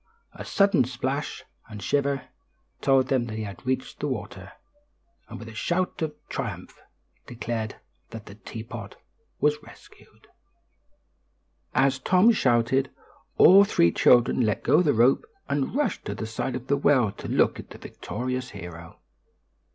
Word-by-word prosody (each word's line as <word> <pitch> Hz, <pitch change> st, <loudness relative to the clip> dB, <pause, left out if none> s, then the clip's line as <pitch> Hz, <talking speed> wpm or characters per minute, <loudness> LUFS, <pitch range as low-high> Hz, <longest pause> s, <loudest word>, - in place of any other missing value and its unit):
A -, -, -8 dB
sudden 195 Hz, -8 st, +3 dB
splash 130 Hz, +3 st, -4 dB, 0.3 s
and 105 Hz, -2 st, -8 dB
shiver 140 Hz, +3 st, -1 dB, 0.5 s
told 135 Hz, -1 st, +3 dB
them 125 Hz, -3 st, +1 dB
he 110 Hz, 0 st, -4 dB
had 100 Hz, +2 st, -8 dB
reached 130 Hz, 0 st, -2 dB
the -, -, -2 dB
water, -, -, -6 dB, 0.8 s
and -, -, -8 dB
a 110 Hz, -, -10 dB
shout 175 Hz, +13 st, -2 dB
of 155 Hz, -2 st, -2 dB
triumph -, -, -6 dB, 0.5 s
declared 115 Hz, -2 st, -4 dB, 0.3 s
that 115 Hz, -2 st, -9 dB
the -, -, -11 dB
teapot 110 Hz, +1 st, -9 dB, 0.4 s
was 150 Hz, 0 st, +1 dB
rescued. -, -, -18 dB, 1.5 s
As 135 Hz, -1 st, +3 dB
Tom 185 Hz, -, +4 dB
shouted, 130 Hz, -, +2 dB, 0.5 s
all 195 Hz, +2 st, +8 dB
three 85 Hz, -, +3 dB
children 125 Hz, +5 st, +4 dB
let 110 Hz, -3 st, 0 dB
go 155 Hz, -, +4 dB
the 155 Hz, -5 st, +3 dB
rope 120 Hz, +4 st, +4 dB, 0.2 s
and 140 Hz, -, -1 dB
rushed 295 Hz, 0 st, -1 dB
to -, -, -4 dB
the 110 Hz, -, -5 dB
side 115 Hz, +3 st, -3 dB
of 125 Hz, -1 st, -6 dB
the 140 Hz, +1 st, +1 dB
well 130 Hz, -7 st, +3 dB
to 100 Hz, -, -9 dB
look -, -, +2 dB
at -, -, -10 dB
the -, -, -11 dB
victorious 125 Hz, 0 st, -5 dB
hero. 85 Hz, -4 st, -10 dB
130 Hz, 145 wpm, -25 LUFS, 110-140 Hz, 1.5 s, all